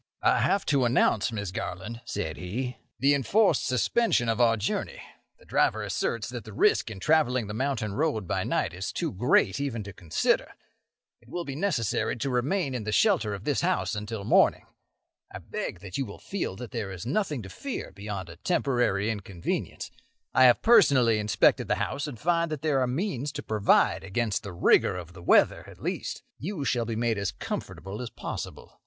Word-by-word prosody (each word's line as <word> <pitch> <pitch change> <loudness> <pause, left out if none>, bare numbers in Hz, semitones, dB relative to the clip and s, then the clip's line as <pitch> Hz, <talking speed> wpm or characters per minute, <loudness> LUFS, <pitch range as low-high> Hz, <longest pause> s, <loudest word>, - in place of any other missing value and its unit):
"I - - +4
have 200 - +1
to 140 -3 +2
announce, 120 -2 +2
Miss 100 -4 -4
Garland," 100 +6 -5
said 80 -7 -3
he, 125 +8 -4 0.2
"the 140 +2 +4
enforced 155 - +2
suspension 125 - +2
of 115 +2 +1
our 115 -1 +4
journey. 105 - -2 0.4
The - - -21
driver - - +1
asserts 115 -3 -2
that 120 -3 -6
the 110 - -10
risk 105 - +3
in 105 -4 -8
travelling 130 -3 +2
the 105 - -6
mountain 115 -4 -1
road 135 - -1
by - - 0
night - - -1
is 95 +3 -4
too 165 -3 -2
great 125 - +2
even 130 -6 -2
to 100 0 -9
consider. 80 -2 0 0.7
It 120 - -21
will 175 +4 -4
be 140 - -5
necessary 150 - 0
to 130 +3 -2
remain 135 +5 0
in 125 -3 -3
the 110 - -3
shelter 150 - +3
of 100 - -9
this 145 +3 0
house 180 -7 0
until 105 0 -4
morning. - - +4 0.7
I - - -6
beg 90 - -5
that 95 +2 -6
you 135 - -1
will 100 - -9
feel 195 - -4
that 120 +2 -8
there 115 -6 -3
is 95 +2 -7
nothing 150 - -1
to 95 - -9
fear 275 - -5
beyond 100 -2 -6
a 85 0 -11
temporary 120 - +1
inconvenience. 100 -5 -4 0.4
I 130 - +6
have 125 -1 +5
personally 140 - +5
inspected 105 -1 +3
the - - +2
house, 145 +2 -2
and 135 -5 -7
find 170 0 +1
that 155 -2 -5
there 150 -4 +2
are 130 - +1
means 145 - -2
to - - -5
provide 105 -3 +3
against 105 +2 -1
the 100 - -7
rigour 90 +1 +3
of 90 -1 -8
the 90 - -12
weather, 85 - +4
at - - -13
least. - - -3 0.2
You 165 -3 -4
shall 120 -2 +1
be 115 0 -3
made 115 -2 0
as 100 -1 -1
comfortable 95 +4 -6
as 120 - -5
possible. - - -7
120 Hz, 195 wpm, -27 LUFS, 100-140 Hz, 0.7 s, I